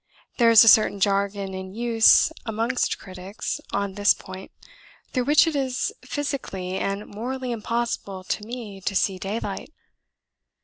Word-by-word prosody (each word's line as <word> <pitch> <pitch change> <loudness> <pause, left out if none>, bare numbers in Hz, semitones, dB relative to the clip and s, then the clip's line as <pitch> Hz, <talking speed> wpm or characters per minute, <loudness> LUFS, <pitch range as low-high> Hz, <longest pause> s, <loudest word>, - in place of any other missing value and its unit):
There 235 -1 +6
is 230 -1 +9
a - - +2
certain 215 -2 +5
jargon 200 0 0
in 190 +1 -7
use 230 +5 +5
amongst 230 +3 -1
critics 185 +2 -6
on 200 -1 -2
this 205 +1 +3
point 190 0 -10 0.6
through 255 -2 -1
which 295 +3 +5
it 325 -2 -2
is 270 +8 -1
physically 195 -11 -4
and 200 +1 -3
morally 250 +4 -5
impossible 230 -4 -3
to 210 - -3
me 220 -4 -8
to 195 - -2
see 190 0 +1
daylight. 200 +6 -5
210 Hz, 140 wpm, -24 LUFS, 195-240 Hz, 0.6 s, is